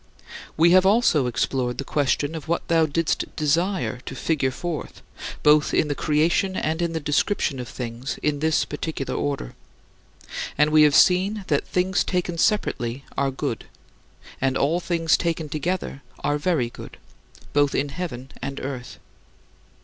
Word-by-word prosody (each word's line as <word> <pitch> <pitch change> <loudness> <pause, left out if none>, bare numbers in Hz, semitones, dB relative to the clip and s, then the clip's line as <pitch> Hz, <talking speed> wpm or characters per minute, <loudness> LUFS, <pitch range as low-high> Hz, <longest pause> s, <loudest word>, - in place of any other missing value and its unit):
We 170 +2 +5
have 185 +1 +7
also 190 - +3
explored 125 +1 -1
the - - -2
question 145 +1 0
of 160 -2 -7
what 170 +1 -1
thou 165 -1 +4
didst 165 +2 0
desire 165 -1 0
to 130 - -5
figure 140 -2 0
forth, 165 +4 -5 0.4
both 150 0 +4
in 150 - +2
the - - +1
creation 165 +6 +1
and 160 0 -1
in 170 -1 -1
the 160 - -1
description 145 0 0
of 125 - -5
things 120 +2 -5
in 150 -1 +1
this 160 +1 +2
particular 150 -2 -4
order. 140 - -2 1.0
And 150 +1 +4
we 155 0 +6
have 150 -2 +5
seen 195 +2 +4
that 145 -2 +1
things 185 0 +1
taken 180 -2 -2
separately 135 - 0
are 140 -1 +1
good, 135 -3 -4 0.8
and 135 0 +1
all 160 +5 +2
things 170 -2 +2
taken 165 -3 -2
together 155 -1 -3 0.2
are 145 0 +1
very 145 -8 0
good, - - -11 0.6
both 145 -1 +3
in 145 +1 0
heaven 135 -5 -6
and 140 0 -4
earth. 130 -2 -6
150 Hz, 155 wpm, -24 LUFS, 140-170 Hz, 1.0 s, have